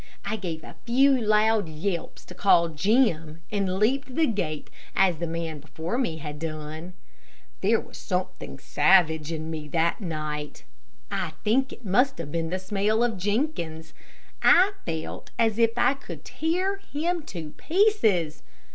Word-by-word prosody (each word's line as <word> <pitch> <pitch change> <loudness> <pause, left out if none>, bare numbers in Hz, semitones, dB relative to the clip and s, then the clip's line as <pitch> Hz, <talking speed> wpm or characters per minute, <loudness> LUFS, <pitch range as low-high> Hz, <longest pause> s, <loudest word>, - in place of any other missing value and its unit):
I 215 - -1
gave 170 -6 -5
a - - -11
few 265 +4 +4
loud 215 -3 +3
yelps 170 +3 -4
to - - -11
call 175 -2 +4
Jim, 165 - +1
and 195 -3 0
leaped 255 +5 +1
the 325 - +4
gate 175 - -3 0.2
as 185 -4 +4
the 170 - -2
man 165 -2 -4
before 160 - -4
me 165 -12 -1
had 150 -1 -7
done. 155 +2 -6 0.7
There - - +3
was - - -11
something 65 - -3
savage 160 - +3
in 160 0 -4
me 155 -2 -5
that 165 +6 +1
night. 155 -4 -4 0.5
I 155 - -2
think 260 +5 +2
it 245 - -12
must 250 +8 +3
have 155 -3 -6
been 165 0 -1
the 185 - -1
smell 205 +4 +1
of 225 -5 0
Jenkins. 180 - -2 0.5
I 375 +3 +6 0.2
felt 160 -1 -4
as 225 -1 +2
if 230 0 +3
I 245 +2 +4
could 275 - -10
tear 365 +5 -1
him 345 -2 -2
to 160 -4 -6
pieces. 225 - +2
185 Hz, 155 wpm, -26 LUFS, 160-235 Hz, 0.7 s, I